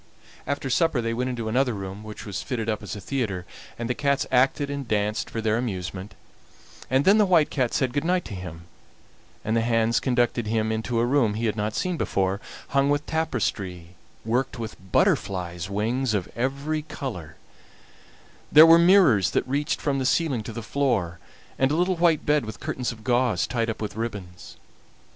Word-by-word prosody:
After 140 0 -2
supper 155 +1 +2
they 115 -1 -1
went 125 +2 -1
into 120 -3 -4
another 125 +1 +1
room, 100 +1 -7
which 110 0 -9
was 100 -3 -4
fitted 115 -4 -3
up 110 -2 -1
as 105 -3 -6
a - - -6
theatre, 100 -4 -3 0.3
and 120 - -3
the 125 - 0
cats 140 0 0
acted 135 +3 +3
and 140 -3 -4
danced 105 0 -1
for 115 - -4
their 110 +1 +1
amusement, 95 -4 -5 0.7
and 130 +2 +2
then 205 +3 +6
the 210 - +5
White 170 -5 +4
Cat 130 -4 0
said 130 -2 0
good 145 +1 0
night 180 +1 +1
to - - -7
him, 90 -3 -8 0.8
and 110 - 0
the 115 - +3
hands 115 0 +2
conducted 120 -3 0
him 110 0 0
into 110 +2 -2
a 115 - +3
room 120 -5 +2
he 115 +2 -2
had 110 - 0
not 105 0 -2
seen 180 -2 -1
before, 95 -4 -1 0.3
hung 140 +1 +2
with 145 +1 +1
tapestry 100 - -2 0.4
worked 125 +3 -1
with 110 -5 -8
butterflies' 90 -2 0
wings 110 +4 0
of 95 -4 -1
every 140 +5 -1
color; 100 - -7 1.2
there 155 +2 +10
were 165 +1 +8
mirrors 170 - +5
that - - -1
reached 145 +3 -1
from 140 -2 -1
the 130 - -1
ceiling 145 -7 +1
to 110 - -7
the 115 0 -6
floor, 110 -10 -1 0.4
and 130 - +3
a 150 - 0
little 180 +2 +1
white 165 -3 +2
bed 150 -1 +3
with 110 -1 -7
curtains 125 -1 -3
of 110 -2 -12
gauze 120 -5 +2
tied 115 -2 -1
up 115 - -4
with 105 -2 -5
ribbons. 105 -6 -6
120 Hz, 190 wpm, -25 LUFS, 105-140 Hz, 1.2 s, there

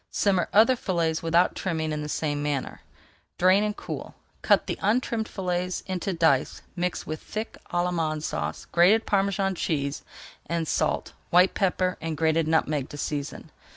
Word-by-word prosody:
Simmer 190 -3 +1
other 225 +5 +6
fillets 170 -7 -1
without 170 +2 +3
trimming 160 -4 -2
in 150 0 -2
the 150 - -5
same 145 -1 -1
manner. 145 -2 -3 0.6
Drain 185 +3 +5
and 210 0 -2
cool. - - -7 0.3
Cut - - +3
the - - -4
untrimmed 225 +1 0
fillets 180 -1 -2
into 185 +1 -2
dice, 160 -6 +1
mix 180 0 -2
with 155 0 -5
thick 215 +1 -5 0.2
Allemande 165 -3 0
Sauce, 75 - -3
grated 195 +6 +5
Parmesan 195 -1 +1
cheese, 145 -5 -2 0.5
and 165 -1 -1
salt, - - -1 0.2
white 180 +2 +5
pepper, 185 -1 0
and 160 -1 -3
grated 160 0 +2
nutmeg 155 -3 +1
to 145 - -8
season. 145 -1 -4
170 Hz, 155 wpm, -26 LUFS, 155-190 Hz, 0.6 s, other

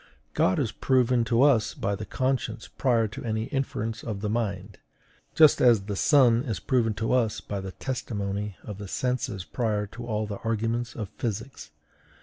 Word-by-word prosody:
God 95 - +2
is 120 -7 0
proven 125 -2 +2
to 120 +2 +3
us 130 -7 +3
by 100 - -1
the 105 +1 -5
conscience 130 -4 -1
prior 115 -4 +1
to 105 - -8
any 110 -2 -1
inference 115 -4 -3
of 105 -4 -4
the 105 -1 -1
mind; 100 -4 -3 0.6
just 155 -2 +6
as 120 -5 +6
the 100 +1 -4
sun 120 -1 +5
is 115 - -3
proven 115 +3 +1
to 110 +4 -1
us 115 -4 +1
by 100 -1 -5
the 95 -1 -7
testimony 105 -5 -4
of 105 -2 -7
the 100 - -6
senses 125 -3 -2
prior 110 -4 -1
to 120 +4 -9
all 110 -1 -1
the 105 -1 -6
arguments 115 +1 -2
of 105 -4 -5
physics. 110 - -4
115 Hz, 175 wpm, -27 LUFS, 105-125 Hz, 0.6 s, just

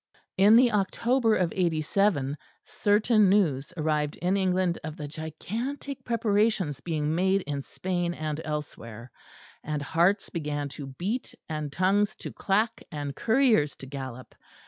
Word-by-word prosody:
In 205 +3 +6
the 245 0 +6
October 225 +3 +2
of 180 -3 0
'87 160 -3 +1 0.3
certain 210 0 +3
news 160 -9 +2
arrived 150 -2 0
in 180 +3 0
England 185 -2 +1
of 155 0 -6
the 150 - -5
gigantic 225 - -5
preparations 210 - +1
being 155 -2 -1
made 190 +3 +2
in 140 -1 -3
Spain 175 +3 -3
and 155 0 -3
elsewhere: 125 -6 -6 0.5
and 150 -1 -3
hearts 175 +7 +2
began 145 -3 -3
to 140 0 -8
beat, 190 - -4
and 155 -2 -4
tongues 200 +5 +2
to - - -8
clack, 215 +4 0
and 145 -3 -4
couriers 225 - +3
to - - -10
gallop. 130 -2 -7
175 Hz, 135 wpm, -27 LUFS, 150-205 Hz, 0.5 s, In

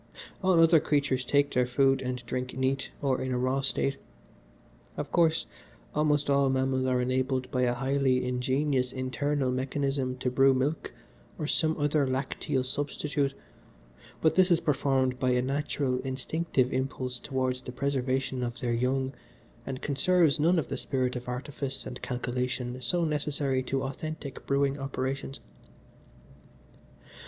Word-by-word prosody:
All 185 -3 +4
other 165 0 +7
creatures 140 -4 +1
take 140 +2 +2
their 125 -1 +2
food 135 +1 +3
and 125 -1 -4
drink 125 +1 -4
neat, 135 +1 0
or 135 -2 +1
in 130 - -2
a 125 - 0
raw 130 +2 +1
state. 135 0 0 1.0
Of - - -4
course, 165 -2 +3 0.5
almost 150 -1 +2
all 140 -1 +3
mammals 130 0 +1
are 125 -1 +2
enabled 130 0 0
by 125 - 0
a 120 0 +1
highly 135 0 +1
ingenious 130 +1 0
internal 130 +1 -1
mechanism 135 0 -1
to 125 0 -1
brew 135 +1 +5
milk, 140 +5 -1 0.5
or 155 - -3
some 160 +1 +1
other 145 -1 +2
lacteal 130 +1 -1
substitute, 145 0 -1 0.9
but 160 - +5
this 185 0 +4
is 170 -2 +4
performed 135 -4 +1
by 130 -2 +1
a 125 - +2
natural, 140 -1 -1
instinctive 130 +1 -1
impulse 130 -1 -2
towards 130 -1 -2
the 125 - -7
preservation 130 -1 -1
of 120 -1 -3
their 120 -1 -1
young 130 +3 0 0.5
and 130 -1 -5
conserves 160 +2 +3
none 170 +4 +4
of 160 - 0
the - - -2
spirit 130 -1 -1
of 125 0 -6
artifice 135 +1 -4
and - - -7
calculation 125 0 -3
so 170 +8 +1
necessary 145 -3 0
to 135 +1 -2
authentic 140 +1 -6
brewing 140 0 +1
operations. 135 0 -3
135 Hz, 145 wpm, -29 LUFS, 130-145 Hz, 1.0 s, other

